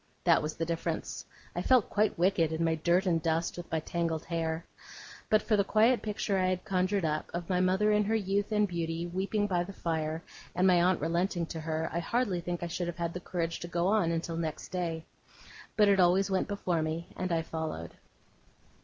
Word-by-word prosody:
That 170 -2 +5
was 155 0 -3
the 165 - -2
difference. 165 0 -3 0.3
I 175 - -1
felt 250 +2 +3
quite 210 0 +2
wicked 170 -2 +2
in 160 +1 -1
my 165 0 +2
dirt 170 +4 +2
and 170 -3 +2
dust, 165 +1 0
with 175 -1 -8
my 160 - +1
tangled 165 0 -2
hair. 165 -1 -2 0.6
But 215 - +4
for 220 - +2
the 200 - +3
quiet 225 +5 +3
picture 205 -2 -1
I 185 - +2
had 185 0 -1
conjured 185 0 +1
up, 155 0 -1
of 175 -1 -4
my 180 - +2
mother 190 +3 +3
in 210 0 +3
her 220 +2 +1
youth 200 0 0
and 210 -1 +3
beauty, 170 -1 -3
weeping 195 +4 -1
by 180 -3 +1
the 200 +3 -8
fire, 160 -2 -2 0.3
and 180 +1 +2
my 180 -2 +5
aunt 180 +1 +3
relenting 170 +2 0
to 160 - -6
her, 160 0 -2
I 170 - 0
hardly 200 -1 0
think 175 0 -4
I - - -1
should 170 +1 -3
have 175 - -4
had 170 -1 -2
the 180 - -4
courage 170 -2 -3
to 175 - -6
go 170 0 -1
on 205 -5 +3
until 165 0 -2
next 160 -2 -4
day. 165 -3 -3 0.7
But 210 -1 +6
it 200 -1 +4
always 185 +2 +4
went 190 - +1
before 185 -5 -1
me, 160 +2 -3
and 185 -1 -3
I 165 -1 +1
followed. 160 - -4
175 Hz, 215 wpm, -30 LUFS, 165-195 Hz, 0.7 s, But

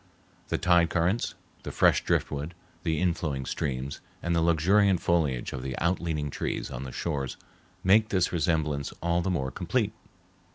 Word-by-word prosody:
The - - 0
tide 85 -3 +4
currents, 90 +7 0 0.3
the - - -6
fresh - - +4
driftwood, 75 +4 -1 0.3
the 80 -2 0
inflowing 80 -7 -1
streams, 70 -1 -3 0.2
and 85 0 +1
the 85 - +3
luxuriant 90 +4 +4
foliage 75 -8 0
of 65 - -4
the 65 0 -4
out 85 +2 +1
leaning 75 -4 -2
trees - - -3
on 65 +3 -5
the 65 - -6
shores 70 -5 -3 0.5
make 110 +4 +5
this 90 -2 +1
resemblance 80 -4 0
all 85 +1 +2
the 95 - -1
more 65 -8 -1
complete. - - -1
80 Hz, 160 wpm, -28 LUFS, 70-90 Hz, 0.5 s, make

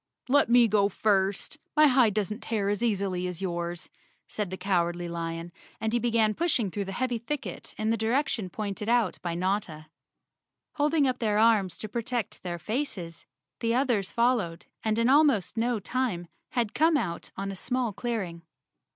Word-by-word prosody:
"Let 280 -1 +4
me 240 -1 +6
go 205 -1 +3
first. 200 +7 0 0.2
My 305 0 +7
hide 250 -7 +4
doesn't 210 +1 -1
tear 210 -3 -1
as 205 +2 -1
easily 195 -5 0
as 180 -2 -5
yours," 175 -2 -3 0.4
said 210 -3 -3
the 190 - -5
Cowardly 175 -2 0
Lion, 165 0 -4 0.3
and 220 +1 -1
he 240 - +3
began 230 -2 +2
pushing 255 - 0
through 200 +1 -3
the 195 - -5
heavy 245 +3 -1
thicket 280 +5 -5
in 215 +1 0
the 230 - +1
direction 225 -2 0
pointed 210 +2 -4
out 235 -6 +2
by 170 -1 -3
Notta. 175 -4 -2 0.8
Holding 295 0 +2
up 255 -1 -1
their 215 -3 +1
arms 215 -4 +3
to 215 - -6
protect 235 0 -3
their 175 -1 -4
faces, 180 - -4 0.3
the 230 0 +1
others 240 -7 +1
followed 230 -9 +1 0.2
and 220 0 +1
in 230 +1 +3
almost 275 - +4
no 235 0 +1
time 205 -6 -2 0.3
had 235 -4 0
come 320 0 +4
out 170 -10 -3
on 195 +1 -3
a - - -6
small 245 +2 -1
clearing. 200 -7 -3
215 Hz, 170 wpm, -28 LUFS, 185-240 Hz, 0.8 s, My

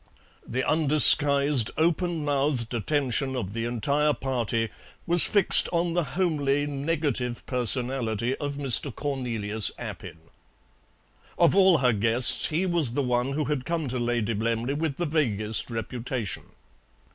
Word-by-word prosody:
The 130 +2 -3
undisguised 145 -4 +4
openmouthed 150 -7 -1
attention 130 +2 -1
of 100 -6 -5
the 115 0 -4
entire 140 +6 -1
party 115 -5 -3 0.4
was 175 0 +6
fixed 200 -3 +6
on 170 -1 -1
the 175 0 0
homely 145 -6 -1
negative 140 -4 -3
personality 125 -1 -1
of 145 -2 -5
Mr. 140 0 +2
Cornelius 115 -7 -2
Appin. - - -9 1.2
Of 170 +1 +2
all 190 -3 +4
her 125 -4 +1
guests, 115 +4 +4
he 165 +5 -2
was 170 -9 -1
the 140 - -1
one 125 +1 -2
who 150 +1 -2
had 145 -3 -3
come 165 0 -4
to 125 0 -4
Lady 120 -2 -2
Blemley 115 +4 -3
with 150 -1 -4
the 175 - -2
vaguest 115 -10 0
reputation. 115 -1 -6
135 Hz, 130 wpm, -25 LUFS, 120-150 Hz, 1.2 s, was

